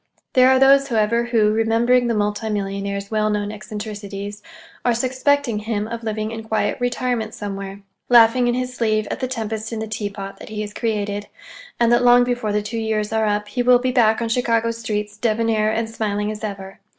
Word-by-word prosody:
There 255 0 +6
are 260 - +5
those, 275 +1 +5
however, 235 -1 +1
who, 225 -3 +2
remembering 230 +3 +2
the 230 - 0
multi 210 +1 -1
millionaire's 200 0 -3
well 215 -1 +1
known 205 -1 -1
eccentricities, 205 -1 -7 0.4
are 240 -1 +2
suspecting 255 -1 +1
him 215 -1 -2
of 230 0 -5
living 215 -1 -3
in 225 0 -5
quiet 220 0 -1
retirement 245 -2 -1
somewhere, 195 -1 -6 0.3
laughing 240 +1 +6
in 240 - +1
his 250 0 -3
sleeve 215 -3 0
at - - -3
the 255 - -1
tempest 225 -3 -4
in 225 - -3
the 220 - -3
teapot 205 -2 -5
that - - -10
he 215 -1 -4
has 210 -1 -6
created; 205 -3 -2 0.5
and 235 -1 +3
that 240 - +4
long 245 0 +6
before 245 -3 -1
the 210 0 0
two 225 +2 -4
years 220 -1 -1
are 220 -1 +1
up, 210 0 -1
he 245 +4 -1
will 250 0 +6
be 255 +1 -1
back 230 -2 +3
on 230 - -2
Chicago's 230 -1 0
streets, 210 -2 -3
debonair 220 -1 +1
and 225 +1 -1
smiling 210 -2 -2
as 215 +1 -8
ever. 195 -2 -6
220 Hz, 200 wpm, -21 LUFS, 210-235 Hz, 0.5 s, There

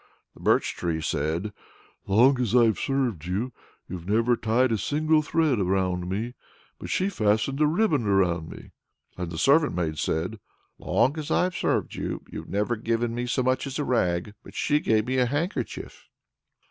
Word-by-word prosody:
The - - -18
birch - - +2
tree 85 -2 -2
said, 80 +6 -2 0.5
"Long 125 +6 +4
as 120 -1 0
I've 115 -5 +4
served 125 - -1
you, 110 +8 -2 0.3
you've 90 0 -7
never 115 +3 +3
tied 115 +3 +1
a 110 - +2
single 155 +6 +2
thread 155 -5 +1
round 90 -1 0
me; 110 +6 -3 0.5
but - - -7
she 185 - +1
fastened 115 - 0
a 150 - +5
ribbon 155 - +1
around 90 -5 +1
me." - - -11 0.4
And 90 -2 -4
the 85 - -6
servant 145 - +3
maid 80 -4 -2
said, 90 +7 -2 0.4
"Long 140 +6 +1
as 150 - -5
I've 180 0 +1
served - - 0
you, - - -4
you've - - -7
never 105 +4 0
given 115 +1 -1
me 120 +1 -3
so 125 +1 0
much 130 +2 0
as 135 - -4
a 150 - -1
rag; 95 -6 0
but - - -14
she 150 - +2
gave 110 -6 +1
me 130 +1 -1
a 125 - +3
handkerchief." 155 - -4
115 Hz, 175 wpm, -26 LUFS, 95-135 Hz, 0.5 s, a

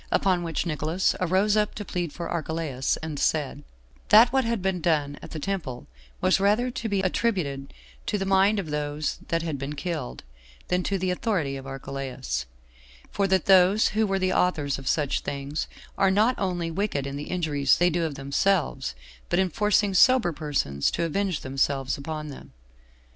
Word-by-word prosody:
Upon 185 -2 +2
which 165 0 -2
Nicolaus 160 +3 0
arose 190 +4 +2
up 210 -1 +1
to 210 - -5
plead 175 -4 -3
for 170 - -5
Archelaus, 160 -5 -2
and 155 -3 -4
said, 145 -2 0 0.5
"That 230 +4 +7
what 265 -1 +3
had 230 -1 0
been 185 -1 -1
done 150 -3 0
at - - -9
the - - -6
temple 150 -8 -4 0.4
was - - +3
rather 215 +6 +2
to 230 -2 -4
be 200 -2 +1
attributed 180 -9 -1 0.4
to 210 - 0
the 195 - -2
mind 195 +2 +4
of 175 -7 -3
those 150 0 -2
that 165 0 0
had 155 -4 -3
been 140 +2 -4
killed, 145 - -4 0.5
than 180 0 +2
to 200 - 0
the 185 0 -1
authority 180 - -1
of 135 0 -8
Archelaus; 130 - -4 0.6
for 200 -1 +1
that 190 -2 +2
those 190 +2 +5
who 215 0 +1
were 195 0 0
the 185 -1 +1
authors 150 -7 +1
of 135 - -9
such 145 0 +1
things 140 +2 -4 0.3
are 195 -1 +5
not 215 +6 +3
only 175 -4 -1
wicked 170 -6 -1
in 140 0 -4
the 145 +1 -6
injuries 150 -6 +2
they 175 0 +3
do 170 +1 0
of 155 -3 -2
themselves, 140 - 0 0.3
but - - +1
in 190 -1 +2
forcing 210 +1 +2
sober 250 -1 +5
persons 140 - -1
to - - -2
avenge 185 +1 -1
themselves 135 0 0
upon 150 +1 -5
them. 140 - -11
170 Hz, 180 wpm, -26 LUFS, 145-195 Hz, 0.6 s, That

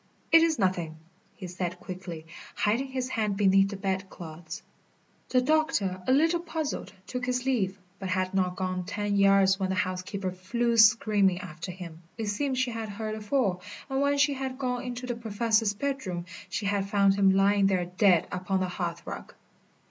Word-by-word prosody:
"It 330 0 +8
is 325 -2 +3
nothing," 175 -5 0 0.4
he 190 - -8
said 180 0 -4
quickly, 180 -3 -7 0.3
hiding 230 +6 +1
his 260 -1 -3
hand 210 -5 -1
beneath 195 -1 +4
the 200 - -5
bed 190 0 -2
clothes. 160 -1 -9 0.7
The 255 - +3
doctor, 250 -11 +1
a - - +3
little 325 +5 +4
puzzled, 320 -3 -4
took 250 +4 -4
his 250 0 -1
leave, 205 -8 0 0.2
but 190 - -4
had 185 0 0
not 185 -2 +1
gone 185 0 -2
ten 205 +1 -2
yards 195 -1 +5
when 190 -1 -1
the 190 - 0
housekeeper 185 0 -2
flew 235 +6 -1
screaming 210 -4 +5
after 180 -1 -7
him. 175 -3 -9 0.2
It 220 -3 -2
seemed 260 +5 -1
she 255 -1 +1
had 225 -1 -4
heard 215 +1 -4
a 215 - -6
fall, 210 -5 0 0.3
and 270 +1 +1
when 285 0 +2
she 285 0 +3
had 265 -1 -4
gone 250 -2 -2
into 250 0 -5
the 245 - -2
Professor's 225 -1 +1
bedroom 215 -9 -3 0.2
she 210 - -3
had 200 -1 0
found 200 -1 +4
him 195 -1 +4
lying 195 0 +4
there 185 -2 +1
dead 180 -1 +3
upon 185 +1 -1
the 185 - -1
hearthrug. 175 -2 -5
200 Hz, 180 wpm, -28 LUFS, 185-245 Hz, 0.7 s, It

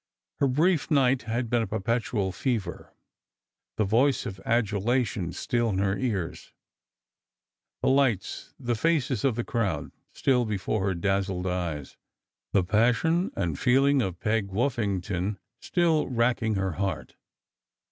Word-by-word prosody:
Her 140 - +3
brief 155 +6 +2
night 135 -3 +3
had 120 +2 -1
been 120 +1 +1
a 110 - -2
perpetual 105 -1 -1
fever; 105 -5 -3 0.9
the 110 - +2
voice 125 +8 +2
of 95 -5 -6
adulation 110 -3 0
still 120 +4 -1
in 95 - -1
her 95 0 +1
ears; 105 -10 -3 1.3
the - - +2
lights, 130 -8 +1
the 120 0 -1
faces 140 -1 +1
of 135 -5 +2
the 120 - -1
crowd, 100 -13 -2 0.2
still 125 -2 +2
before 105 -1 -1
her 95 - 0
dazzled 95 0 -1
eyes; 85 -6 -3 0.5
the 100 - +3
passion 120 - +2
and 85 -7 -2
feeling 135 +2 +4
of 90 -6 -3
Peg 105 -2 0
Woffington 100 -4 -1 0.2
still 165 -4 +1
racking 115 -2 +1
her 95 -1 0
heart. 95 +3 -3
115 Hz, 130 wpm, -27 LUFS, 95-125 Hz, 1.3 s, feeling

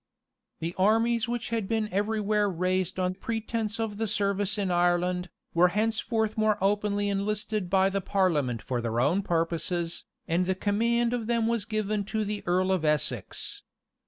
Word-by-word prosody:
[*] - - -56
The 165 +2 -2
armies 225 +4 +3
which 240 -1 -2
had 225 -3 -1
been 220 -1 0
everywhere 210 0 +1
raised 185 +1 -1
on 185 0 0
pretence 225 +2 -3
of 220 -2 -2
the 225 +1 -1
service 200 -1 0
in 195 -3 0
Ireland, 175 +1 +1 0.2
were 175 +2 +5
henceforth 220 +2 0
more 215 -1 +2
openly 205 +1 +1
enlisted 205 0 -1
by 190 0 +4
the 195 0 -1
parliament 155 - +1
for 125 -2 -2
their 115 0 -1
own 155 +10 +2
purposes, 170 -1 -1 0.2
and 175 +2 +1
the 190 - +1
command 235 +4 +1
of 235 -3 -2
them 235 -1 +1
was 230 -3 0
given 215 -1 -1
to 215 +1 -1
the 205 0 -3
earl 185 +2 +2
of 185 -4 +1
Essex. 150 -2 -1
200 Hz, 165 wpm, -28 LUFS, 180-220 Hz, 0.2 s, were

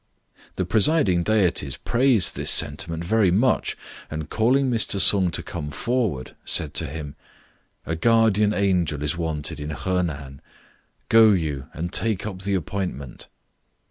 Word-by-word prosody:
The 95 - -2
presiding 105 - +2
deities 90 -8 0
praised 120 -5 +2
this - - -1
sentiment 80 +3 0
very 110 0 +2
much, 110 +9 +1 0.3
and 80 -1 -6
calling 130 +5 +2
Mr. 115 -5 0
Sung 95 -1 +5
to 85 - -4
come 75 - -6
forward, 100 - -2
said 75 -2 0
to 80 - -1
him 75 0 -7 0.7
"A 80 - -3
Guardian 105 +2 +3
Angel 90 -8 0
is 75 - -1
wanted 80 -3 -4
in 75 +1 -6
Honan. 80 -6 -3 0.7
Go 110 -1 +6
you 75 -7 -3
and 85 +3 -6
take 105 0 +1
up 95 -3 -6
the 100 0 -1
appointment." 90 -7 -5
90 Hz, 140 wpm, -23 LUFS, 75-110 Hz, 0.7 s, Go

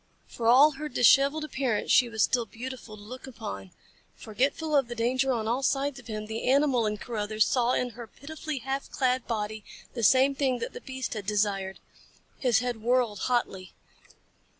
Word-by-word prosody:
For 230 - -4
all 270 +6 +7
her 300 +1 -5
disheveled 275 +4 +4
appearance 260 -7 -1
she 250 -2 +5
was 220 -2 +1
still 240 -3 +1
beautiful 240 -2 -8
to 205 - -13
look 255 +5 -9
upon. 100 - -7 0.5
Forgetful 280 +7 -1
of 275 -4 +3
the 240 - -6
danger 255 +3 +1
on 225 -3 -1
all 240 +4 0
sides 275 0 0
of 240 - -15
him, 215 -1 -5
the 220 +3 -3
animal 265 -4 +3
in 210 0 -2
Carruthers 215 -1 -1
saw 245 -1 +1
in 250 -1 -1
her 235 +1 -9
pitifully 305 +3 -7
half 270 +2 -4
clad 255 -1 0
body 215 -2 -3 0.3
the 235 - -4
same 265 +5 +5
thing 265 -2 0
that - - -5
the 475 - -8
beast 260 -2 -5
had 210 -3 -6
desired. 200 -2 -1 0.6
His 245 -4 +2
head 245 -3 -3
whirled 240 -3 +1
hotly. 195 -7 -1
245 Hz, 180 wpm, -27 LUFS, 220-270 Hz, 0.6 s, all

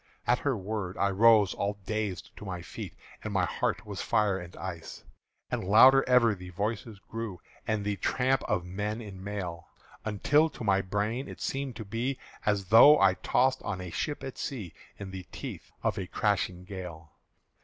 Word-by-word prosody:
At 125 +1 +3
her 140 -5 0
word 100 -1 -4
I 100 0 +2
rose 105 -1 +5
all 100 +1 -2
dazed 105 -3 -3
to - - -9
my 90 -3 -5
feet, - - -8 0.3
And - - -4
my - - +2
heart - - -1
was - - -5
fire 100 -3 +2
and 85 0 -10
ice. 85 -2 -7 0.5
And - - -1
louder 130 +8 +7
ever 120 -3 +5
the 90 -2 -9
voices 105 +3 -3
grew, 110 -2 -6 0.3
And 110 -2 0
the 105 -1 -1
tramp 130 +6 +1
of 90 - 0
men 105 +4 -3
in 100 -4 -9
mail; 90 -5 -5 0.4
Until 145 +9 +3
to 130 - -9
my 100 -2 +3
brain 105 +7 -2
it - - -9
seemed 135 -2 -3
to 110 - -7
be 120 +6 -2 0.3
As 100 -2 +2
though 145 +7 +9
I 95 -1 +6
tossed 130 +7 +1
on 95 -2 -3
a 90 -2 -6
ship 150 - -3
at 135 -2 -6
sea 105 - -4 0.2
In 100 -2 -7
the 95 -2 -8
teeth - - -7
of 100 - 0
a 95 - -4
crashing 95 -3 0
gale. 90 -5 -8
105 Hz, 185 wpm, -29 LUFS, 95-115 Hz, 0.5 s, though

